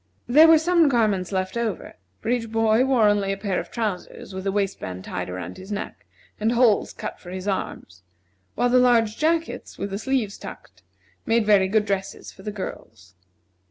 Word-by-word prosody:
There 305 +6 +7
were 325 0 +8
some 335 -1 +3
garments 210 -7 +1
left 185 +1 -2
over, 230 -5 -3 0.3
for - - -4
each 235 -2 0
boy 225 +1 +3
wore 250 -5 +4
only 205 -1 +2
a 195 - -2
pair 195 -2 -1
of - - -7
trousers 210 -4 -4
with 190 0 -6
the 195 - +1
waistband 190 - -3
tied 90 0 -4
around 90 0 -6
his 190 +2 -10
neck, 205 +1 -6 0.3
and 220 +2 +1
holes 235 -4 +3
cut - - -7
for 175 - -12
his 185 +2 -6
arms; 90 - -4 0.5
while 245 +2 +2
the 250 +1 +5
large 230 -3 +3
jackets, 320 -5 -1
with 200 0 -4
the 195 - -3
sleeves 240 -5 -1
tucked, - - -11 0.5
made 225 -1 +2
very 200 -3 +4
good 210 +2 +2
dresses 195 -1 -3
for - - -16
the 210 - -5
girls. 110 - -8
210 Hz, 190 wpm, -24 LUFS, 190-240 Hz, 0.5 s, were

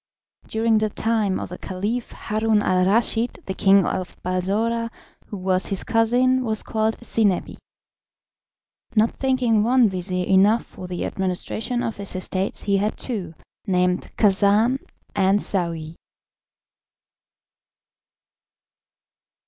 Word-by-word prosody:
During 220 0 +2
the 215 0 0
time 215 -3 0
of - - -6
the 180 - -8
Caliph 210 +6 -3
Haroun 215 -1 0
al 185 0 +2
Raschid 230 +3 +1
the 190 - -3
king 195 -1 +4
of 185 -1 -3
Balsora, 210 +6 -1 0.4
who 205 - -6
was 185 0 0
his 195 - -1
cousin, 250 +3 +2
was 220 -3 +2
called 220 0 -1
Zinebi. 210 -5 0 1.4
Not 220 +1 +4
thinking 255 -5 +2
one 240 0 +4
vizir 180 -1 -2
enough 200 +5 +4
for 180 - -10
the 180 -1 -3
administration 195 +6 -2
of 225 - -3
his 200 -1 -5
estates 185 +1 -3
he 200 -1 +2
had 210 +2 -1
two, 190 -10 -4 0.3
named 180 -1 0
Khacan 210 +5 +3 0.4
and 195 0 +3
Saouy. 170 -5 -2
205 Hz, 115 wpm, -23 LUFS, 185-225 Hz, 1.4 s, king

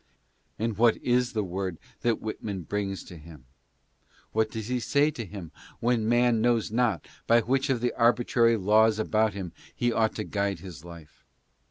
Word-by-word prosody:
And 110 -2 -2
what 115 -1 +5
is 125 0 +1
the 110 -2 0
word 95 -1 -4 0.2
that 120 -2 0
Whitman 105 -3 -5
brings 95 +2 -3
to 90 - -11
him? 75 -4 -14 0.9
What 110 0 +1
does 110 -1 -5
he 125 0 -1
say 145 +5 +2
to 120 - -6
him 95 -4 -9 0.3
when 115 -2 +1
man 120 -1 +3
knows 120 -2 +1
not 115 -7 0 0.2
by. 115 0 +5
which 135 +4 0
of 125 -3 +1
the 125 - 0
arbitrary 115 -1 +3
laws 110 +2 +4
about 110 0 +1
him 95 -4 -5 0.2
he 120 -1 0
ought 110 -1 +1
to 105 - -3
guide 100 -2 -1
his 90 -5 -10
life 85 -3 -13
110 Hz, 175 wpm, -27 LUFS, 95-120 Hz, 0.9 s, what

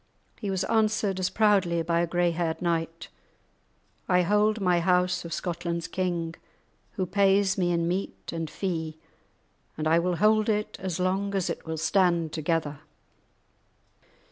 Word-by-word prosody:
He 205 - -4
was 190 -1 -1
answered, 215 -3 +1
as 185 - 0
proudly, 195 -6 +2
by 170 0 +1
a 170 - +1
grey 175 0 +1
haired 165 -1 -2
knight: 165 -1 -2 1.0
"I 180 -1 +4
hold 210 +3 +2
my 180 -3 +2
house 180 0 +2
of 170 - -7
Scotland's 170 0 -3
king, 170 -2 -2 0.6
who 190 -4 -1
pays 195 0 +3
me 175 -2 +1
in 170 -1 +1
meat 185 +3 -3
and 165 -2 -3
fee, 160 -3 -3 0.8
and 155 0 -1
I 165 +1 +4
will 180 +1 0
hold 215 +3 +3
it 210 0 -1
as 185 -2 -3
long 195 +2 0
as 190 -3 0
it - - -7
will 160 0 -3
stand 170 -2 +2
together." 155 -2 -1
180 Hz, 150 wpm, -27 LUFS, 165-195 Hz, 1.0 s, I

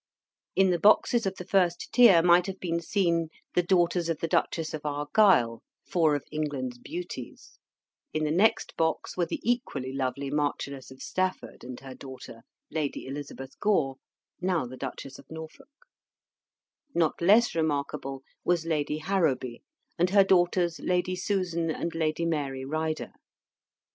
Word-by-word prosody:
In 190 -1 +4
the 175 - +1
boxes 215 +2 +4
of 190 - -2
the 180 - -8
first 180 -3 +1
tier 210 -10 +7
might 175 +1 +5
have 195 0 -5
been 170 -2 -1
seen 170 -2 +1 0.3
the 180 - +4
daughters 175 -1 +2
of 165 - 0
the 165 - -2
Duchess 160 0 0
of 155 - -5
Argyle, 145 - +3 0.3
four 160 -4 +3
of 145 - -3
England's 140 -5 -3
beauties; 170 -4 -8 0.5
in 155 - -1
the 150 - 0
next 195 +7 +2
box 160 -1 0
were 175 -2 0
the - - -3
equally 140 - -1
lovely 135 +1 -2
Marchioness 140 -2 -2
of 130 0 -11
Stafford 185 0 -2
and 125 0 -7
her 135 -1 -9
daughter, 130 -4 -10 0.3
Lady 150 -3 -2
Elizabeth 135 -1 -8
Gore, 155 -11 +1 0.4
now 180 -6 +1
the 125 +1 -8
Duchess 135 +1 -7
of - - -17
Norfolk: 160 - -10 1.3
not 165 -2 +1
less 215 +7 +5
remarkable 140 -4 -2 0.2
was 175 -2 +1
Lady 150 -2 -1
Harrowby 155 -8 0 0.4
and 175 +1 +3
her 200 +1 +6
daughters 175 -3 +2
Lady 180 +2 0
Susan 180 -3 -1
and 170 +1 -2
Lady 165 0 0
Mary 140 -5 -2
Ryder. 155 +2 -2
160 Hz, 150 wpm, -28 LUFS, 140-180 Hz, 1.3 s, tier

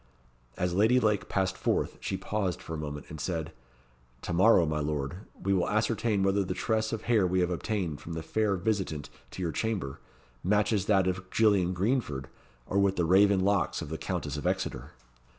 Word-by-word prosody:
As 90 0 0
Lady 110 +7 +4
Lake 105 -4 +1
passed 95 -1 0
forth, - - -1
she 95 - -3
paused 95 -2 -2
for 80 - -8
a - - -2
moment, 75 -1 -5
and 75 -2 -7
said 80 -3 -3 0.7
"To 90 - -3
morrow, 90 0 +5
my 75 -1 -1
Lord, 75 +1 -2 0.2
we 100 +1 0
will 90 -2 +1
ascertain 110 -1 +1
whether 95 +1 +2
the 95 - -3
tress 110 -1 0
of 115 - -3
hair 110 -6 +3
we 90 +1 +1
have 90 0 +1
obtained 90 -4 -2
from 85 - -7
the 80 0 -4
fair 105 +3 +1
visitant 95 -7 -2 0.2
to 95 - -6
your 85 - -1
chamber, 100 -9 -2 0.4
matches 105 +2 +2
with 100 - -7
that 95 -3 +4
of 95 0 -2
Gillian 100 -5 +3
Greenford 95 - -1 0.4
or 100 - 0
with 100 -1 +3
the 85 - +1
raven 95 +2 +5
locks 100 +1 +1
of - - -6
the 80 - -4
Countess 75 +1 -3
of 75 - -2
Exeter." - - -2
95 Hz, 195 wpm, -29 LUFS, 85-105 Hz, 0.7 s, morrow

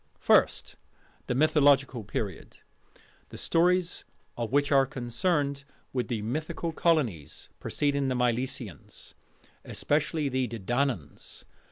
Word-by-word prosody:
First: - - +2 0.5
The 125 - 0
Mythological 140 -4 +4
Period, 100 -2 -5 0.7
the - - -9
stories 180 +1 +2 0.3
of 115 -1 -3
which 145 +1 +2
are 135 -1 +5
concerned 140 +3 -1 0.3
with 125 -2 -1
the 110 -4 -2
mythical 155 +7 -3
colonies 120 - 0
preceding 140 -1 0
the 130 - 0
Milesians, 125 - -3 0.5
especially 150 +1 0
the 130 -1 0
Dedannans. 115 - -3
135 Hz, 100 wpm, -28 LUFS, 120-145 Hz, 0.7 s, are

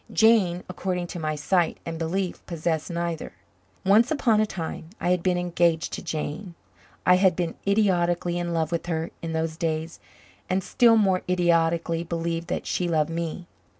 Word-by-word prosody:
Jane, 210 -6 +4
according 185 -1 -3
to 175 - -5
my 155 -1 -2
sight 165 +3 +1
and 165 -1 -5
belief, 180 +3 -2
possessed 160 -2 -2
neither. 170 -2 -3 0.5
Once 215 +6 +5
upon 240 -8 +3
a 215 - +1
time 165 -3 -6
I 175 - +1
had 180 -1 +2
been 180 0 +1
engaged 170 -2 +1
to - - -4
Jane. 165 +2 -4 0.5
I 180 +2 +6
had 185 -2 +4
been 175 -2 -2
idiotically 175 -4 +2
in 175 0 -2
love 165 -1 0
with 170 0 -2
her 165 -1 -2
in 165 -1 -4
those 160 0 -2
days 160 -1 -2 0.5
and 185 +1 +1
still 230 +2 +4
more 190 -4 +3
idiotically 170 -1 +2
believed 170 0 -3
that - - -3
she 180 - -1
loved 160 -1 +1
me. 170 +1 -4
170 Hz, 170 wpm, -25 LUFS, 165-185 Hz, 0.5 s, I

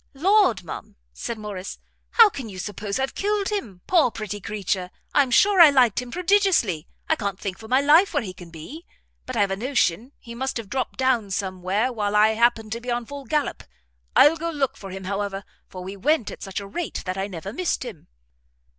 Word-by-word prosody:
"Lord, 360 - +3
ma'am," 165 - -8 0.2
said 235 - -5
Morrice, 205 -3 -6 0.4
"how 460 -2 +9
can 275 - -6
you 190 - -9
suppose 200 +1 -4
I've 265 0 -1
killed 410 -1 0
him? 230 - -4
Poor, 335 -8 +4
pretty 210 -2 -6
creature, 195 -3 -2 0.2
I'm 275 -3 +4
sure 390 +9 +5
I 325 - +10
liked 255 -5 +3
him 250 - -9
prodigiously. 350 - +2 0.2
I 320 - +3
can't 200 -7 -4
think 190 -2 -5
for 220 - -10
my 260 +3 +3
life 315 +7 +5
where 290 -6 0
he 185 -3 -6
can 175 -1 -12
be; 170 - -10 0.4
but 255 -2 -4
I - - +3
have 200 -1 +2
a - - 0
notion 235 -1 0
he 235 - -11
must 265 +2 -3
have 225 -4 -7
dropt 260 0 -2
down 255 -6 +1
some 190 -2 -3
where 205 +8 0
while 210 -2 -1
I 210 +1 +6
happened 225 -1 +2
to 230 +1 -3
be 245 - -7
on 240 0 -1
the - - -18
full 285 -1 -7
gallop. 300 +3 -1 0.5
I'll 300 +3 +7
go 335 +1 -3
look 285 -5 -1
[for] 195 - -9
him, 190 +1 -7
however, 200 0 -3 0.3
for 185 -1 -8
we 190 +2 -6
went 265 +3 +1
at - - -10
such 195 0 -4
a 200 - -8
rate 305 - -4
that 185 0 -2
I 195 - -1
never 190 +1 -7
missed 355 -5 -1
him." 210 -11 -9
225 Hz, 220 wpm, -24 LUFS, 195-280 Hz, 0.5 s, I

